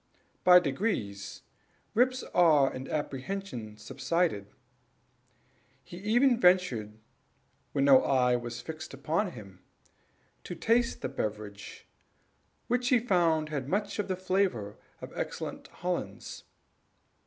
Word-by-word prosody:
By 180 0 +9
degrees 135 - -3 0.5
Rip's 255 +2 +2
awe 155 -5 +5
and 130 +1 -7
apprehension 140 - -4
subsided. 135 - -1 1.4
He 175 - -11
even 235 +6 +3
ventured, 135 - +2 0.7
when 140 -1 +1
no 135 -2 +7
eye 125 -2 +3
was 120 -1 -5
fixed 160 -3 -8
upon 165 +7 -1
him, 100 -5 -12 0.8
to 175 - -6
taste 235 +4 +1
the - - 0
beverage, 105 -1 -6 0.8
which 245 +1 0
he 255 - +5
found 170 -9 +2
had 140 -3 -4
much 205 +4 -1
of 205 - -1
the 190 - -1
flavor 185 - -1 0.3
of - - -9
excellent - - -5
Hollands. - - -5
160 Hz, 110 wpm, -29 LUFS, 125-195 Hz, 1.4 s, By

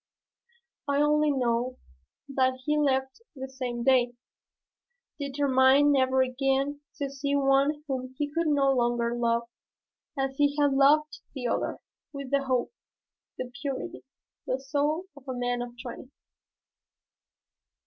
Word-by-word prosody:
I 280 0 +1
only 300 +1 +3
know 250 -2 0 0.5
that 260 -2 0
he 300 - +2
left 265 - 0
the 265 -1 -6
same 250 -3 -4
day, 250 -2 +3 1.1
determined 280 0 +4
never 260 -1 +3
again 270 +2 0
to 285 - -2
see 280 +1 -1
one 280 +2 +2
whom 260 -2 -4
he 295 - 0
could 335 0 0
no 280 -2 +3
longer 240 -2 +1
love 235 -1 +1 0.7
as 270 0 -2
he 285 0 +3
had 285 -1 +3
loved 295 +3 +4 0.2
the 255 -3 -5
other, 235 - -1 0.3
with 280 -2 -7
the 280 -1 +1
hope, 255 - 0 0.6
the 255 -1 -5
purity, 275 -2 -4 0.4
the 255 - 0
soul 290 +5 -1
of 280 -1 -16
a 260 - -3
man 245 0 -1
of 240 0 -7
twenty." 250 0 -8
270 Hz, 130 wpm, -28 LUFS, 255-285 Hz, 1.1 s, determined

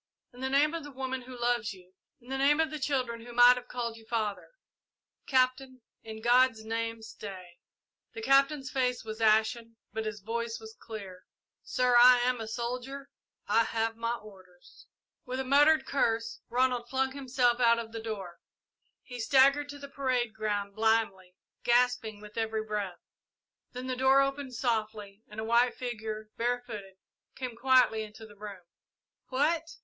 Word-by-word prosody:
In 245 - -14
the 265 - -1
name 290 +3 +3
of 335 -2 -4
the 290 - -8
woman 260 -1 -4
who 250 0 -11
loves 240 -3 0
you 185 -1 -17 0.3
in 245 - -18
the 270 - -2
name 290 +3 +4
of 320 -1 +1
the 305 - -5
children 255 -4 -1
who 240 0 -10
might 245 +1 +8
have 250 0 -8
called 235 -2 -4
you 225 - -15
father 215 -4 -2 0.8
Captain 255 0 +1 0.2
in 220 0 -9
God's 240 -2 +4
name 225 0 -3
stay!" 185 -5 -10 0.6
The 440 - -6
Captain's 275 -3 +3
face 250 -2 0
was 220 0 -7
ashen, 225 +1 +2 0.2
but 220 -1 -3
his 215 -1 -5
voice 230 +2 -3
was 220 0 -11
clear. 195 -5 -9 0.3
"Sir, 250 -1 +1
I 250 +1 +9
am 250 -1 0
a 220 - -5
soldier 250 +4 -5 0.4
I 230 - +4
have 225 0 -1
my 230 +1 -2
orders!" 185 -5 -16 0.4
With 255 0 -4
a - - 0
muttered 290 +4 +5
curse, 230 -4 0
Ronald 245 -1 +1
flung 265 +1 0
himself 255 -3 +1
out 235 -1 +5
of 230 -1 -5
the 225 0 -6
room. 210 -5 -5 0.7
He 245 -1 -9
staggered 275 +4 +4
to 285 - -7
the 280 0 -9
parade 255 -5 -1
ground 205 -2 -2
blindly, 215 -4 0 0.3
gasping 240 -3 +2
with 210 +1 -7
every 220 -1 -1
breath. 205 -5 -4 0.7
Then 250 +1 -6
the 255 0 -2
door 265 +2 +5
opened 275 -1 -2
softly 215 -4 -2
and 210 +1 -9
a - - -2
white 235 +2 +3
figure, 220 -3 -5
barefooted, 230 -5 -3 0.4
came 250 -3 -5
quietly 250 -2 +4
into 215 +1 -9
the 210 -1 -15
room. 200 -3 -9 0.7
"What!" 320 +5 0
235 Hz, 165 wpm, -30 LUFS, 220-260 Hz, 0.8 s, I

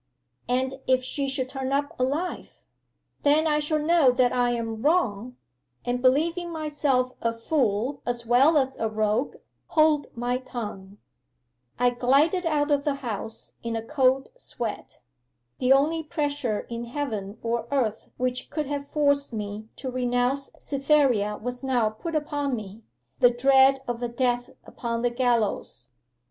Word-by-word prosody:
'"And 260 +1 +1
if 255 0 +3
she 275 +1 -1
should 265 -1 -2
turn 265 0 -4
up 285 +1 0
alive?" 290 +8 -3 0.6
'"Then 295 +2 +4
I 300 -1 +2
shall 300 +1 0
know 310 -2 +4
that 245 0 +2
I 245 -1 +2
am 225 -2 -3
wrong, 250 - +1 0.5
and 245 0 -1
believing 330 +7 +2
myself 295 -5 0
a 230 - +1
fool 235 +1 -1
as 240 -1 -3
well 265 +7 +5
as 265 -2 +1
a 225 - -1
rogue, 215 +4 0 0.3
hold 310 -2 +3
my 245 +1 -1
tongue." 210 -6 -7 0.8
'I 245 0 +4
glided 285 +9 +2
out 300 -2 +1
of 285 -1 +2
the 290 -1 0
house 225 -4 -6
in 230 -1 -3
a 225 - -3
cold 265 0 +2
sweat. 240 - -6 0.6
The 255 0 +2
only 300 +4 +4
pressure 290 -7 -2
in 235 0 -6
heaven 225 -6 -4
or 230 0 -1
earth 235 -6 -1
which 255 0 -2
could 305 -2 -2
have 285 0 -4
forced 285 -2 +1
me 210 -1 -5
to 260 - -5
renounce 250 +2 0
Cytherea 275 -7 +2
was 245 +2 -5
now 245 -5 +1
put 320 +10 -6
upon 290 -3 -1
me 210 -1 -8 0.4
the 245 - +7
dread 265 +2 +4
of 240 0 -3
a 240 - 0
death 245 0 0 0.2
upon 230 -1 -4
the 245 - +2
gallows. 235 - -1
255 Hz, 150 wpm, -26 LUFS, 235-285 Hz, 0.8 s, the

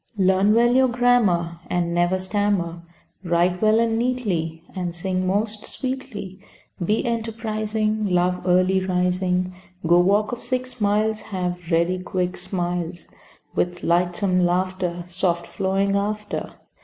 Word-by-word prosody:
Learn 190 +2 +4
well 240 +1 +4
your 260 0 +5
grammar, 225 -9 +2
And 175 -1 0
never 175 +2 +2
stammer, 185 -3 -1 0.4
Write 175 +1 +1
well 215 +1 +4
and 225 -1 +1
neatly, 185 -10 -1
And 180 -2 -3
sing 185 +1 -1
most 210 +2 -1
sweetly, 255 -8 -5 0.4
Be 210 +5 +1
enterprising, 220 -2 -1
Love 180 0 +1
early 185 +1 +3
rising, 180 0 0 0.3
Go 175 +2 +5
walk 200 +4 +3
of 240 - -5
six 255 -2 -3
miles, 210 +1 +1
Have 180 -3 -4
ready 170 +2 +2
quick 180 0 -2
smiles, 175 -1 -3 0.4
With 175 0 -1
lightsome 180 +2 +2
laughter, 180 0 0
Soft 175 -1 -1
flowing 195 +1 0
after. 210 +1 -2
185 Hz, 125 wpm, -23 LUFS, 175-215 Hz, 0.4 s, your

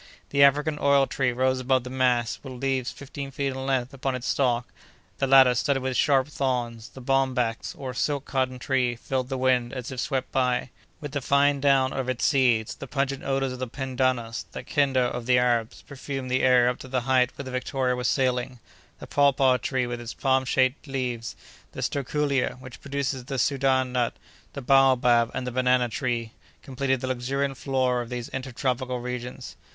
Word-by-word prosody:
The 140 - +2
African 150 +2 +4
oil 140 -1 +4
tree 130 -2 0
rose 130 +1 +1
above 130 0 +1
the 125 - -8
mass, 125 -3 +1
with 135 -2 -8
leaves 130 0 -1
fifteen 140 0 -8
feet 140 +1 -2
in 130 0 -5
length 130 -1 0
upon 135 0 -2
its 125 0 -6
stalk, 125 -3 +1 0.5
the 135 - +1
latter 130 -2 +7
studded 135 +2 0
with 130 -1 -2
sharp 135 -1 +3
thorns; 120 -6 -2
the 130 - -12
bombax, 130 -3 0
or 130 -2 -5
silk 140 +2 -1
cotton 130 -1 -1
tree, 125 -2 0
filled 130 +1 -3
the 135 - -2
wind, 125 -2 +1
as 130 -1 -5
it 130 - -5
swept 130 -1 -2
by, 125 -1 0 0.3
with 145 -2 -6
the 145 -1 -2
fine 140 +1 +3
down 135 -1 +3
of 130 -1 -2
its 130 -2 -1
seeds; 125 -6 +2
the 140 - -9
pungent 140 0 -2
odors 135 -1 -1
of 125 - -8
the 130 - -3
pendanus, 130 -2 -1
the - - -6
"kenda" 135 -3 +1
of 125 -1 -2
the 125 -1 +5
Arabs, 120 -2 0
perfumed 135 -2 -6
the 130 - +2
air 125 -1 +5
up 125 - -1
to - - -9
the 130 -1 -1
height 130 0 +3
where 140 - -7
the 130 - -6
Victoria 130 0 -1
was 125 0 -1
sailing; 125 -1 0 0.4
the - - -9
papaw 135 -2 +3
tree, 130 -1 -1
with 120 0 -5
its 120 0 -7
palm 130 -1 +1
shaped 130 +3 +1
leaves; 125 -4 -3 0.4
the - - -6
sterculier, 140 -1 -1
which 130 -2 -11
produces 140 -2 -3
the 135 +1 -4
Soudan 130 -1 +1
nut; 125 -2 0 0.4
the 140 - -6
baobab, 125 -3 +4
and 125 - -3
the 125 - -3
banana 125 0 +2
tree, 115 +1 -2 0.3
completed 130 -1 -1
the 130 - -3
luxuriant 135 +2 -1
flora 130 -2 0
of 120 - -7
these 125 -2 -5
inter 130 0 -5
tropical 125 0 -2
regions. 125 0 -6
130 Hz, 195 wpm, -26 LUFS, 125-135 Hz, 0.5 s, latter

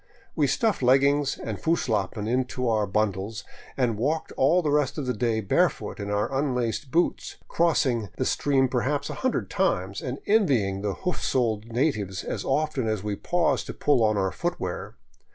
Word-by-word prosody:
We - - +2
stuffed 225 - +1
leggings 140 +3 +3
and - - -5
Fusslappen 110 - 0
into 125 +1 -1
our 110 -2 +1
bun 105 +2 +1
dles 100 +3 -6 0.3
and 120 -5 0
walked 155 +6 -1
all 165 +7 +3
the 150 - +1
rest 145 -1 +1
of 145 - -2
the 125 - 0
day 110 0 0
barefoot 100 - 0
in 100 - -4
our 105 +6 -1
unlaced 130 -1 -1
boots, 170 +6 0
crossing 130 - +1
the - - 0
stream 135 -2 +2
perhaps 135 +3 -1
a - - -7
hundred 260 -2 -1
times, 100 - 0
and 125 +1 -4
envying 130 - +2
the 100 -1 -2
hoof 180 - -1
soled 115 -4 0
natives 115 - -1
as - - -4
often 140 -3 0
as 110 -3 -1
we 105 -1 -2
paused 175 - 0
to - - -6
pull 135 -6 +2
on 110 -1 +2
our 95 -1 +1
footwear. - - -4
125 Hz, 175 wpm, -26 LUFS, 105-145 Hz, 0.3 s, leggings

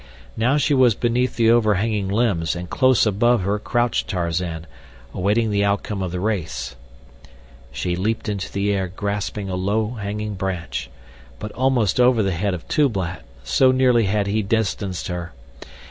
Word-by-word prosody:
Now 125 +6 +2
she 145 +1 +2
was 125 -5 +4
beneath 125 +1 0
the 115 -1 +4
overhanging 105 -2 +2
limbs 100 -6 0
and 90 0 -5
close 130 -2 +4
above 110 +2 +2
her 100 +2 0
crouched 120 +2 0
Tarzan, 85 -2 -2 0.5
waiting 105 +4 +1
the 100 0 +2
outcome 100 0 -1
of 95 -2 -2
the 90 - -3
race. 80 - -3 1.0
She 85 +6 -2
leaped 110 +5 -2
into 100 -2 -3
the 100 +1 0
air 95 -2 -1
grasping 100 +2 -3
a 95 - -3
low 105 +4 0
hanging 105 -1 -4
branch, 90 -9 -4 0.5
but 105 - -6
almost 125 -6 +1
over 125 -3 +4
the 95 - 0
head 95 +2 -1
of 85 - -10
Tublat, 95 - 0 0.2
so 130 - +4
nearly 125 -3 +3
had 100 +1 +1
he 105 +2 0
distanced 100 -3 -1
her. 85 -2 -5
100 Hz, 160 wpm, -22 LUFS, 90-115 Hz, 1.0 s, was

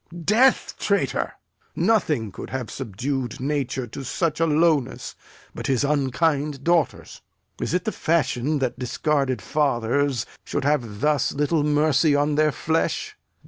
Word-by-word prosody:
Death, 240 +6 +3
traitor! - - 0 0.4
nothing 150 - +1
could 95 - -8
have 130 -4 -4
subdu'd 130 +2 -4
nature 135 -2 -2
To 130 +4 -8
such 155 +4 -1
a 165 - +3
lowness 150 -4 +1 0.4
but - - -5
his 130 -2 +1
unkind 145 0 0
daughters. 170 -2 0 0.4
Is - - -1
it 180 - -1
the 220 - 0
fashion 150 - 0
that 130 -2 -2
discarded 135 +1 0
fathers 140 -2 0 0.2
Should 145 - -3
have 120 -8 0
thus 150 -3 +2
little 150 +2 +1
mercy 150 0 +3
on 145 +1 +2
their 155 +1 +3
flesh? 160 +3 -1
145 Hz, 135 wpm, -23 LUFS, 130-155 Hz, 0.4 s, Death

